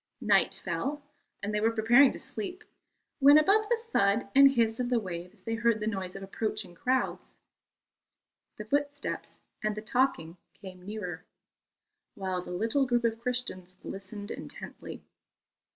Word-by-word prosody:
Night - - +3
fell, 290 +1 -3 0.4
and 205 +1 -2
they 210 - +1
were 225 - +4
preparing 230 +5 +5
to - - -8
sleep, 370 -2 -5 0.6
when, 285 +1 +8
above 415 +7 +4
the 475 - +3
thud 235 - +1
and 275 0 +8
hiss 230 -3 +1
of 245 -1 -1
the 250 - +2
waves 180 0 -7
they 225 - -3
heard 230 -1 +2
the 210 - -3
noise 190 -4 -3
of 195 - -7
approaching 210 -1 -3
crowds. 255 +9 -1 1.2
The 210 - -6
footsteps 285 +3 -2 0.2
and 215 -1 -1
the 215 - -5
talking 215 -9 0 0.2
came 185 -1 -12
nearer, 190 -6 -5 0.9
while 185 -2 -2
the - - -10
little 225 +9 +1
group 240 -1 +1
of 225 -1 0
Christians 235 -7 -3
listened 200 +2 -7
intently. - - -6
225 Hz, 150 wpm, -29 LUFS, 195-260 Hz, 1.2 s, when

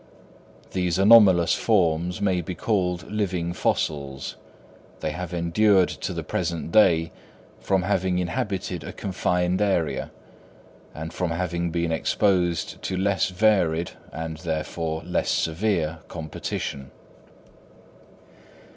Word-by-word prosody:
These 90 -2 0
anomalous 95 -4 +7
forms 90 -4 +1
may 95 -3 +1
be 90 +2 -6
called 90 -5 -1
living 90 -5 -1
fossils; 70 -5 -2 0.6
they 75 - -2
have 90 +2 -5
endured 90 +3 +3
to - - -4
the - - -4
present 85 -2 -3
day, 80 -6 +4 0.5
from 95 -2 +1
having 95 -1 +1
inhabited 95 +2 -2
a - - -7
confined 90 -1 0
area, 80 -10 0 0.9
and 80 +1 -6
from 90 -2 -1
having 85 0 -2
been 85 0 -1
exposed 90 +1 +1
to 95 - -3
less 95 0 +1
varied, 90 -4 +2 0.2
and 80 +1 -5
therefore 80 0 -3
less 90 - -1
severe, 80 -2 0
competition. 75 -4 -5
90 Hz, 110 wpm, -25 LUFS, 80-95 Hz, 0.9 s, anomalous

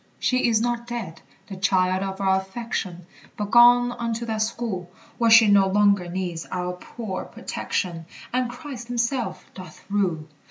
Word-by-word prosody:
She 255 -1 +1
is 225 -2 +3
not 240 0 -2
dead, 225 -10 -6 0.2
the 195 - -8
child 185 -1 +1
of 195 0 -4
our 190 -1 +3
affection, 190 -4 -5 0.3
But 205 -1 -4
gone 245 0 +7
unto 235 -1 -3
that 220 -2 -2
school 215 -5 -3 0.3
Where 230 -1 +3
she 225 -1 +8
no 200 -1 +5
longer 200 -2 +3
needs 175 -2 -4
our 180 0 -3
poor 190 +1 -6
protection, 165 -3 -4 0.3
And 250 -1 0
Christ 250 -2 -8
himself 245 +1 -2
doth 185 -1 -12
rule. 180 -7 0
205 Hz, 155 wpm, -24 LUFS, 185-235 Hz, 0.3 s, she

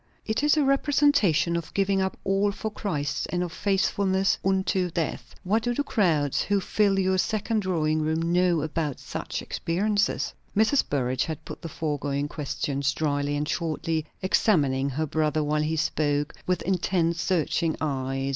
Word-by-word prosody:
"It 220 +3 0
is 295 +1 +3
a 300 - +4
representation 275 - +3
of 170 -1 -5
giving 195 -1 +2
up 190 0 -2
all 195 +1 +2
for 220 +2 -4
Christ, 150 -9 -2
and 180 0 -1
of 175 - -4
faithfulness 195 -1 +1
unto 190 -1 +1
death. 165 -2 -4
What 210 +5 +1
do 240 +1 -1
the 290 - 0
crowds 160 - +1
who 205 -1 +1
fill 200 +1 +1
your 190 -1 +2
second 215 +2 0
drawing 160 -5 0
room 160 +1 0
know 180 -2 +3
about 155 -3 -2
such - - -5
experience?" 205 +5 0 0.5
Mrs. 220 +6 +4
Burrage 130 -2 0
had 160 -3 -6
put 155 - -8
the 165 - -6
foregoing 145 -2 -2
questions 140 -1 -2
dryly 145 -1 -1
and 150 +1 -2
shortly, 160 -1 -2 0.2
examining 140 -9 +2
her 150 +4 -1
brother 155 0 0
while 150 +1 +1
he 155 +1 0
spoke, 150 -2 0
with 180 0 0
intent, 175 -2 +1
searching 165 -1 0
eyes. 135 -2 -2
170 Hz, 160 wpm, -26 LUFS, 150-195 Hz, 0.5 s, a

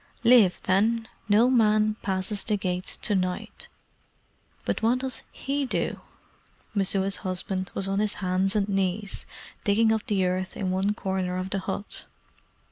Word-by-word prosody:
"Live, 230 -6 +6
then. 220 +4 +2 0.2
No 215 +4 +5
man 215 -3 +3
passes 195 0 -1
the 210 -2 0
gates 185 -2 -2
to 210 - 0
night. 185 -2 -2 1.0
But - - -1
what 230 +3 +3
does 255 -2 -3
HE 275 0 -2
do?" - - -2 0.7
Messua's 195 -1 +2
husband 185 0 -3
was 195 - -1
on 195 +1 0
his 210 -1 0
hands 190 +1 +1
and 205 -2 +2
knees 195 0 -1 0.4
digging 220 +2 +3
up 220 - -2
the 195 -3 +1
earth 185 +1 -2
in 185 -2 -1
one 195 +3 +1
corner 190 -2 -2
of 185 +1 -4
the 195 - 0
hut. 195 +2 -5
195 Hz, 150 wpm, -26 LUFS, 185-215 Hz, 1.0 s, Live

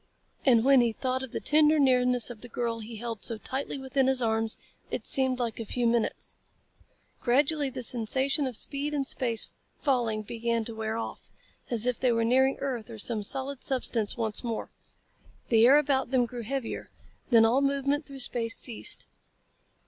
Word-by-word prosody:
And 235 -2 +5
when 270 -2 +6
he 235 -2 +1
thought 255 +2 -2
of 265 -3 -7
the - - -3
tender 305 +1 +4
nearness 250 -3 +4
of 225 -3 -11
the 245 - -10
girl 230 0 -2
he 225 +1 -8
held 230 -1 -6
so 230 - 0
tightly 265 +5 -4
within 265 0 0
his 265 -1 +2
arms, 225 -1 0 0.3
it - - -4
seemed 260 -1 +3
like 235 -3 -3
a - - -3
few 240 +3 -2
minutes. 235 -1 0 0.8
Gradually 280 +3 +2
the 255 -1 -5
sensation 260 +5 +2
of 250 - -4
speed 285 +6 -3
and 275 -2 -1
space 235 -4 0 0.3
falling 235 -6 0
began 230 +1 -2
to 230 - -6
wear 220 0 -3
off, 230 - -7 0.4
as 235 -2 +2
if 250 -1 0
they 255 - +2
were 230 -1 +1
nearing 265 +3 +3
earth 250 -5 -3
or 225 - -8
some 215 0 -3
solid 265 +5 -4
substance 240 -5 -1
once 220 -1 -1
more. 230 -2 -4 0.8
The 230 0 +6
air 275 +3 +7
about 275 -4 +1
them 255 -2 +2
grew 240 0 -7
heavier. 255 +1 -4 0.4
Then 230 -3 +6
all 245 +5 +3
movement 280 +1 0
through 275 -2 -6
space 230 -2 +2
ceased. 235 -4 -3
245 Hz, 180 wpm, -28 LUFS, 230-270 Hz, 0.8 s, air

